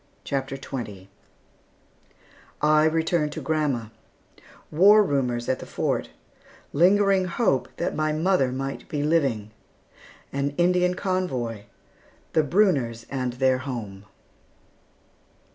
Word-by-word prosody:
CHAPTER 135 -1 -3
XX 105 -9 -7 1.5
I 155 +1 +4
RETURN 160 0 +1
TO 150 - -6
GRANDMA 140 -8 -1 0.8
WAR 205 +7 +6
RUMORS 125 -8 -1
AT 130 - 0
THE - - -9
FORT - - -2 0.6
LINGERING 195 +4 +4
HOPE 180 - 0
THAT 170 - -2
MY 155 0 0
MOTHER 160 -4 +2
MIGHT 135 +1 -5
BE 145 -1 -2
LIVING 135 -10 0 0.8
AN 140 +1 -2
INDIAN 180 +1 +2
CONVOY 130 - -2 0.7
THE 155 - +4
BRUNNERS 145 - +1
AND 130 -3 -2
THEIR 130 0 +2
HOME. 110 -7 -6
145 Hz, 105 wpm, -25 LUFS, 125-175 Hz, 1.5 s, WAR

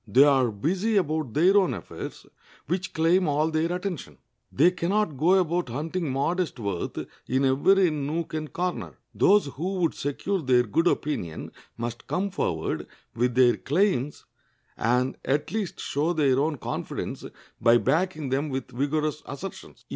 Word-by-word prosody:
They 135 +4 +6
are 135 -4 +4
busy 185 - 0
about 155 - -1
their 180 +6 +5
own 190 -3 +3
affairs, - - -8 0.4
which 180 +4 -2
claim 170 +3 +3
all 150 +2 +1
their 160 +2 0
attention. 180 -2 -4 0.3
They 165 +7 +4
can 175 -1 -3
not 205 -6 +1
go 165 +8 +4
about 175 -4 +1
hunting 155 +5 -3
modest 165 +6 -1
worth 100 -6 -3 0.3
in 130 +2 +1
every 175 +7 +4
nook 155 +3 -3
and 155 -1 -4
corner. 180 0 -3 0.2
Those 205 +1 +4
who 170 +8 -4
would 175 -4 +1
secure 180 +7 -2
their 125 -3 +4
good 165 - +1
opinion 90 - -2 0.3
must 120 0 -5
come 195 +2 -1
forward 80 - -2 0.3
with 120 +1 0
their 125 -2 +5
claims, 150 -3 0 0.5
and 125 +3 +1
at 145 +2 0
least 210 -5 -3
show 155 +5 0
their 140 -5 +3
own 150 +1 0
confidence - - -5 0.4
by 115 +1 +6
backing 155 0 0
them 140 +4 0
with 130 -1 -4
vigorous 150 +4 -1
assertions. 165 +8 -8
155 Hz, 155 wpm, -26 LUFS, 130-180 Hz, 0.5 s, They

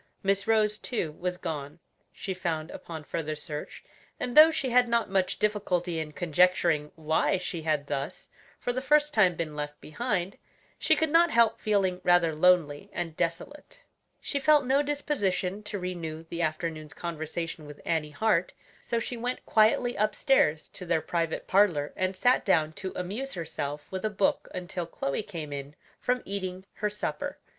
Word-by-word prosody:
Miss 195 +1 +1
Rose, 215 -1 +3
too, 190 -11 -2
was 180 +3 -3
gone, 150 -4 -5 0.3
she 190 - -5
found 165 -3 -3
upon 160 -2 -8
further 155 0 -3
search, 150 0 -7 0.4
and 245 -1 -3
though 310 +1 +10
she 280 -5 -1
had 245 0 +5
not 235 -3 +1
much 190 -1 +1
difficulty 180 -5 0
in 155 -1 -4
conjecturing 170 -2 +2
why 160 +3 +1
she 180 -2 -4
had 155 -2 0
thus, 145 +4 -4 0.3
for 245 - -2
the 255 - -2
first 300 +2 +3
time, 185 -5 +4
been 155 -2 -4
left 150 0 -5
behind, 195 +1 -2 0.4
she - - +4
could 320 -2 0
not 340 +2 +6
help 230 -5 +4
feeling 195 -4 +1
rather 175 -2 +4
lonely 155 -3 +3
and 165 -3 -4
desolate. 280 - -4 0.4
She 280 - -2
felt 295 0 +5
no 270 +3 +3
disposition 210 -10 -1
to 210 - -4
renew 170 -4 -5
the 170 - -2
afternoon's 155 -1 -3
conversation 165 -1 -4
with 150 -1 -11
Annie 160 -2 0
Hart, 185 +2 +1 0.3
so 235 - -2
she 235 +1 -3
went 245 +2 -3
quietly 230 +3 +3
upstairs 210 - +2
to - - -10
their 165 -1 +2
private 165 -1 -2
parlor 180 -7 +3
and 185 0 -1
sat 245 +6 +3
down 160 -5 +2
to 190 +3 -5
amuse 210 +10 -4
herself 150 -3 -4
with 190 -1 -4
a 215 - +1
book 205 -2 +1
until 175 -1 -4
Chloe 140 0 -2
came 165 -8 -6
in 140 +1 -6 0.2
from 250 0 0
eating 190 -1 -4
her 210 - 0
supper. 210 0 -4
180 Hz, 170 wpm, -28 LUFS, 160-215 Hz, 0.4 s, though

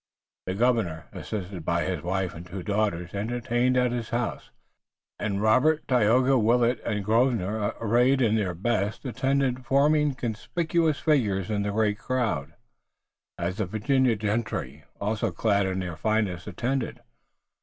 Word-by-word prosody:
The 95 - -2
governor, 105 -8 +1
assisted 95 -4 -6
by 85 0 0
his 90 -2 -2
wife 95 0 -2
and 85 - -9
two 90 +1 -7
daughters, 100 -4 -1
entertained 120 +4 0
at 125 -1 +2
his 120 -2 -3
house, 120 +1 -3 0.7
and 100 0 -1
Robert, 150 +8 +3
Tayoga, 125 +2 +4
Willet, 120 +2 +2
and 105 -3 -2
Grosvenor, 110 -2 +1
arrayed 120 +4 +3
in 115 -4 +3
their 95 -5 -1
best, 110 - -1
attended, 130 0 0
forming 145 +2 +3
conspicuous 155 +7 -1
figures 110 - +1
in 100 -1 0
a - - -1
great 105 0 +1
crowd, 110 - -2 0.8
as 90 +2 -3
the 110 -4 -1
Virginia 125 +4 +2
gentry, 100 - -3
also 110 +2 -1
clad 100 +2 +1
in 95 0 -2
their 90 -3 -3
finest, 105 -3 -1
attended. 120 +6 -2
110 Hz, 140 wpm, -26 LUFS, 95-125 Hz, 0.8 s, Tayoga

